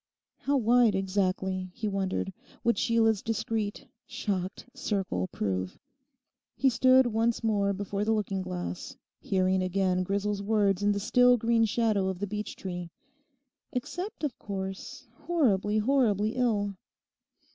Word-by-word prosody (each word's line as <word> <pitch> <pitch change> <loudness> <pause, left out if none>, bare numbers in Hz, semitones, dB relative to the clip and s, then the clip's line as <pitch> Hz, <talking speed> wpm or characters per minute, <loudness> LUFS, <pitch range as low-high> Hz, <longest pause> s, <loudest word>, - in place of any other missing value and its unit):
How 280 0 +1
wide 235 -3 +4
exactly, 190 -1 -1
he 230 -2 -3
wondered, 195 -1 -2 0.3
would 235 - +2
Sheila's 225 -3 +3
discreet, 220 -2 -2 0.2
shocked 190 -2 -3
circle 200 -8 -2
prove? 95 - -3 0.8
He 265 -1 +3
stood 255 +2 +5
once 230 0 0
more 205 -3 +2
before 200 +1 -2
the 220 - +1
looking 205 -3 0
glass, 90 - -5 0.2
hearing 185 -1 +1
again 185 0 +1
Grisel's 200 +2 -1
words 200 -2 +2
in 205 0 +3
the 200 - 0
still 245 +4 +5
green 230 0 +3
shadow 215 -3 +1
of 190 -1 -2
the 205 - -2
beech 210 +1 -5
tree, 180 -2 -6 0.8
'Except 355 - -4
of 285 -6 -2
course, 190 -1 -6
horribly, 215 - +1
horribly 215 -3 +2
ill. 215 -5 0
205 Hz, 130 wpm, -29 LUFS, 190-230 Hz, 0.8 s, stood